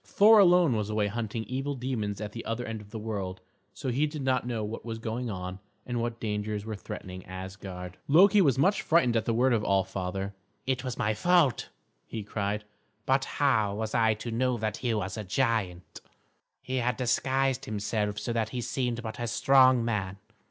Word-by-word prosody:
Thor 215 Hz, +2 st, +6 dB
alone 175 Hz, -, +5 dB
was 105 Hz, -1 st, -1 dB
away 105 Hz, -1 st, +1 dB
hunting 110 Hz, +1 st, -3 dB
evil 135 Hz, +4 st, -3 dB
demons 115 Hz, -6 st, -3 dB
at 105 Hz, -1 st, -5 dB
the 115 Hz, +2 st, -7 dB
other 115 Hz, +2 st, -3 dB
end 110 Hz, -1 st, -5 dB
of 105 Hz, -, -14 dB
the 110 Hz, -, -6 dB
world, 100 Hz, -4 st, -4 dB, 0.3 s
so 135 Hz, -, -5 dB
he 140 Hz, +5 st, +1 dB
did 150 Hz, -2 st, -5 dB
not 130 Hz, -2 st, +1 dB
know 115 Hz, -3 st, -2 dB
what 105 Hz, +2 st, -5 dB
was 115 Hz, -1 st, -5 dB
going 115 Hz, +2 st, -3 dB
on, 90 Hz, -1 st, -5 dB, 0.3 s
and 120 Hz, -1 st, -2 dB
what 120 Hz, 0 st, -3 dB
dangers 105 Hz, -1 st, -3 dB
were 110 Hz, -1 st, -4 dB
threatening 95 Hz, -2 st, -8 dB
Asgard. 95 Hz, -1 st, -7 dB
Loki 195 Hz, +7 st, +6 dB
was 140 Hz, -7 st, +3 dB
much 190 Hz, +8 st, +3 dB
frightened 155 Hz, -8 st, +3 dB
at 110 Hz, -1 st, +1 dB
the 115 Hz, -, +1 dB
word 125 Hz, +2 st, +3 dB
of 110 Hz, -2 st, +1 dB
All 95 Hz, -2 st, +3 dB
Father. 95 Hz, +2 st, -4 dB, 0.3 s
"It 130 Hz, -1 st, -1 dB
was 125 Hz, -2 st, -4 dB
my 105 Hz, +1 st, +1 dB
fault," 160 Hz, -, +2 dB, 0.4 s
he 110 Hz, -2 st, -5 dB
cried, 105 Hz, 0 st, -2 dB, 0.4 s
"but 135 Hz, 0 st, +2 dB
how 110 Hz, -8 st, +1 dB
was 110 Hz, 0 st, -3 dB
I 110 Hz, -2 st, +3 dB
to 115 Hz, +2 st, -6 dB
know 125 Hz, +2 st, +1 dB
that 110 Hz, -1 st, -2 dB
he 125 Hz, -, -1 dB
was 105 Hz, 0 st, -3 dB
a 110 Hz, -, -3 dB
giant? 105 Hz, -4 st, -1 dB, 0.6 s
He 130 Hz, 0 st, -2 dB
had 125 Hz, 0 st, 0 dB
disguised 135 Hz, +1 st, +1 dB
himself 105 Hz, -2 st, -2 dB
so 110 Hz, +3 st, -3 dB
that 115 Hz, -2 st, 0 dB
he 125 Hz, -, -4 dB
seemed 120 Hz, -1 st, -2 dB
but 110 Hz, -1 st, -6 dB
a 120 Hz, -, -2 dB
strong 130 Hz, -1 st, +5 dB
man. 100 Hz, -4 st, -2 dB
115 Hz, 200 wpm, -28 LUFS, 105-130 Hz, 0.6 s, Thor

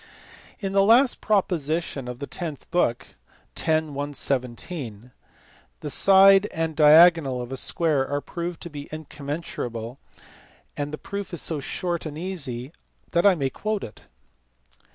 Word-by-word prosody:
In 195 Hz, -3 st, -3 dB
the 195 Hz, -, +4 dB
last 240 Hz, +6 st, +5 dB
proposition 165 Hz, -, -1 dB
of 125 Hz, -1 st, -6 dB
the 140 Hz, -, -5 dB
tenth 155 Hz, -2 st, -7 dB
book 170 Hz, -9 st, 0 dB, 0.5 s
(x. -, -, -3 dB, 0.2 s
117) 135 Hz, -, -4 dB, 0.7 s
the 150 Hz, -, -4 dB
side 195 Hz, +3 st, +6 dB
and 160 Hz, -3 st, -3 dB
diagonal 155 Hz, -3 st, +6 dB
of 125 Hz, +1 st, -6 dB
a -, -, -3 dB
square 150 Hz, -1 st, +1 dB
are 145 Hz, +1 st, -1 dB
proved 170 Hz, +3 st, -6 dB
to 170 Hz, -, -8 dB
be 145 Hz, -1 st, -8 dB
incommensurable. 140 Hz, -6 st, -6 dB, 0.8 s
The 145 Hz, +1 st, -4 dB
proof 200 Hz, -1 st, -6 dB
is -, -, +1 dB
so 160 Hz, -3 st, +1 dB
short 170 Hz, +4 st, -3 dB
and 150 Hz, -1 st, -7 dB
easy 145 Hz, -8 st, -4 dB, 0.4 s
that 175 Hz, +3 st, +3 dB
I 195 Hz, -, +5 dB
may 135 Hz, -5 st, -2 dB
quote 215 Hz, +5 st, -3 dB
it. 105 Hz, -, -10 dB
155 Hz, 135 wpm, -24 LUFS, 135-180 Hz, 0.8 s, side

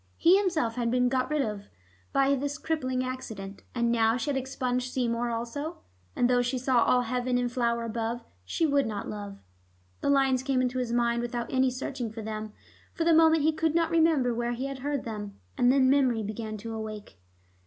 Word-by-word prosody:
He 350 Hz, +3 st, +6 dB
himself 330 Hz, -, +1 dB
had 235 Hz, -1 st, 0 dB
been 250 Hz, +1 st, +2 dB
got 255 Hz, 0 st, 0 dB
rid 300 Hz, -2 st, +1 dB
of 210 Hz, -3 st, -5 dB, 0.4 s
by 275 Hz, 0 st, +3 dB
this 285 Hz, +2 st, -2 dB
crippling 260 Hz, -6 st, -1 dB
accident, 220 Hz, -6 st, -6 dB
and 235 Hz, -1 st, +1 dB
now 225 Hz, 0 st, +3 dB
she 255 Hz, +4 st, -1 dB
had -, -, -2 dB
expunged 255 Hz, -1 st, -2 dB
Seymour 240 Hz, -2 st, 0 dB
also. 240 Hz, +8 st, -4 dB, 0.4 s
'And 245 Hz, -, +3 dB
though 245 Hz, 0 st, +3 dB
she 245 Hz, +1 st, -1 dB
saw 250 Hz, -2 st, +3 dB
all 250 Hz, -, +3 dB
heaven 250 Hz, +1 st, 0 dB
in 245 Hz, 0 st, 0 dB
flower 235 Hz, -1 st, 0 dB
above, 230 Hz, +1 st, -3 dB, 0.2 s
she 95 Hz, -, 0 dB
would 280 Hz, -4 st, +2 dB
not 210 Hz, -2 st, -4 dB
love.' 205 Hz, -1 st, -6 dB, 0.6 s
The -, -, -1 dB
lines 270 Hz, -2 st, +3 dB
came 265 Hz, -1 st, 0 dB
into 255 Hz, 0 st, 0 dB
his 245 Hz, -2 st, -2 dB
mind 235 Hz, 0 st, +1 dB
without 240 Hz, 0 st, -4 dB
any 260 Hz, 0 st, +3 dB
searching 255 Hz, -1 st, -4 dB
for 225 Hz, 0 st, -7 dB
them; 215 Hz, 0 st, -5 dB, 0.4 s
for 335 Hz, -, 0 dB
the 335 Hz, 0 st, +4 dB
moment 320 Hz, -1 st, +5 dB
he 315 Hz, -, +4 dB
could 320 Hz, 0 st, 0 dB
not 335 Hz, -1 st, +2 dB
remember 320 Hz, -7 st, +3 dB
where 240 Hz, +1 st, -1 dB
he 250 Hz, +3 st, -3 dB
had 275 Hz, -1 st, -5 dB
heard 285 Hz, 0 st, -2 dB
them. 210 Hz, -3 st, -6 dB, 0.2 s
And 245 Hz, 0 st, +4 dB
then 265 Hz, -1 st, +4 dB
memory 260 Hz, -5 st, +3 dB
began 215 Hz, +1 st, -5 dB
to 225 Hz, +2 st, -6 dB
awake. 215 Hz, -, -7 dB
250 Hz, 205 wpm, -28 LUFS, 230-275 Hz, 0.6 s, He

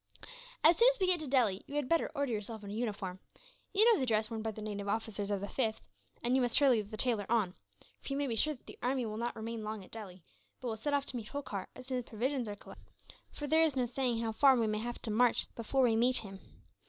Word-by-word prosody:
"As 325 Hz, +2 st, +7 dB
soon 470 Hz, -, +6 dB
as -, -, -6 dB
we 380 Hz, -, +3 dB
get 365 Hz, -1 st, +3 dB
to 310 Hz, -, -5 dB
Delhi, 235 Hz, -8 st, +2 dB
you 285 Hz, -, -7 dB
had 295 Hz, -3 st, 0 dB
better 330 Hz, +2 st, +2 dB
order 280 Hz, -4 st, 0 dB
yourself 215 Hz, 0 st, -5 dB
a 200 Hz, 0 st, -6 dB
uniform. 205 Hz, -5 st, -3 dB, 0.5 s
You 420 Hz, +2 st, +6 dB
know 465 Hz, -5 st, +6 dB
the 260 Hz, -, 0 dB
dress 215 Hz, 0 st, +1 dB
worn 225 Hz, -1 st, -3 dB
by 220 Hz, -, -2 dB
the 215 Hz, -, -7 dB
native 205 Hz, -1 st, -4 dB
officers 205 Hz, -1 st, -2 dB
of 200 Hz, -2 st, -1 dB
the 200 Hz, -, -3 dB
5th; 220 Hz, -1 st, 0 dB, 0.5 s
and 245 Hz, +2 st, +2 dB
you 265 Hz, -, +4 dB
must 245 Hz, -2 st, +2 dB
hurry 260 Hz, -6 st, +5 dB
the 210 Hz, +1 st, -8 dB
tailor 225 Hz, -4 st, 0 dB
on, 215 Hz, -6 st, +2 dB, 0.5 s
for 275 Hz, -, -4 dB
you -, -, -1 dB
may 285 Hz, -, 0 dB
be 240 Hz, -4 st, -1 dB
sure 305 Hz, +7 st, +1 dB
that 245 Hz, -, -24 dB
the -, -, -12 dB
army 255 Hz, 0 st, 0 dB
will 215 Hz, -1 st, -4 dB
not 235 Hz, +1 st, -2 dB
remain 225 Hz, 0 st, -5 dB
long 215 Hz, -1 st, -5 dB
at -, -, -20 dB
Delhi; 190 Hz, -5 st, -9 dB, 0.4 s
but 255 Hz, -, -4 dB
will 220 Hz, -, -2 dB
set 285 Hz, +6 st, -1 dB
off 280 Hz, -1 st, 0 dB
to 265 Hz, -, -5 dB
meet 220 Hz, -3 st, -6 dB
Holkar 240 Hz, -9 st, -5 dB
as 255 Hz, -, -10 dB
soon 255 Hz, -1 st, -1 dB
as 245 Hz, -, -7 dB
provisions 245 Hz, +1 st, -2 dB
are 205 Hz, -, -4 dB
collected, -, -, -15 dB, 0.4 s
for 295 Hz, -, -6 dB
there 315 Hz, +2 st, +4 dB
is 315 Hz, -4 st, +3 dB
no 255 Hz, -2 st, +2 dB
saying 245 Hz, -1 st, -1 dB
how 225 Hz, -, -1 dB
far 265 Hz, +4 st, +6 dB
we 230 Hz, -2 st, +2 dB
may 215 Hz, 0 st, 0 dB
have 240 Hz, +2 st, -4 dB
to 225 Hz, -, -2 dB
march 240 Hz, +3 st, +3 dB
before 260 Hz, +4 st, 0 dB
we 230 Hz, -3 st, +4 dB
meet 245 Hz, +3 st, +3 dB
him. 195 Hz, -2 st, -7 dB
235 Hz, 270 wpm, -33 LUFS, 215-270 Hz, 0.5 s, As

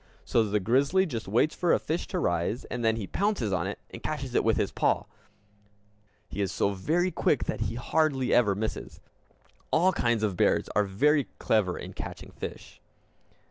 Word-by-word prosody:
So 115 Hz, -, +3 dB
the 105 Hz, 0 st, 0 dB
grizzly 140 Hz, -, +3 dB
just 120 Hz, -, -5 dB
waits 120 Hz, +10 st, +2 dB
for 175 Hz, -, +1 dB
a -, -, +5 dB
fish 160 Hz, +3 st, -3 dB
to 185 Hz, -, -3 dB
rise 85 Hz, -, -1 dB
and 120 Hz, -1 st, -3 dB
then 110 Hz, 0 st, +3 dB
he 110 Hz, -3 st, -4 dB
pounces 190 Hz, -, 0 dB
on 90 Hz, 0 st, 0 dB
it 100 Hz, -, -4 dB
and -, -, -9 dB
catches 135 Hz, -5 st, -4 dB
it -, -, +3 dB
with 115 Hz, -, +2 dB
his -, -, 0 dB
paw. -, -, +1 dB, 1.2 s
He 100 Hz, -, -4 dB
is 95 Hz, -, 0 dB
so 100 Hz, -, +1 dB
very 165 Hz, -, 0 dB
quick 150 Hz, -4 st, +1 dB
that -, -, -3 dB
he 110 Hz, +1 st, -2 dB
hardly 135 Hz, 0 st, +1 dB
ever 105 Hz, -5 st, +4 dB
misses. 110 Hz, +2 st, -4 dB, 0.7 s
All 180 Hz, +4 st, +4 dB
kinds 120 Hz, -, 0 dB
of 100 Hz, -4 st, 0 dB
bears -, -, +2 dB
are 105 Hz, +1 st, +1 dB
very 140 Hz, +9 st, +2 dB
clever 100 Hz, -5 st, +1 dB
in -, -, -8 dB
catching -, -, -8 dB
fish. -, -, -8 dB
115 Hz, 185 wpm, -28 LUFS, 100-155 Hz, 1.2 s, a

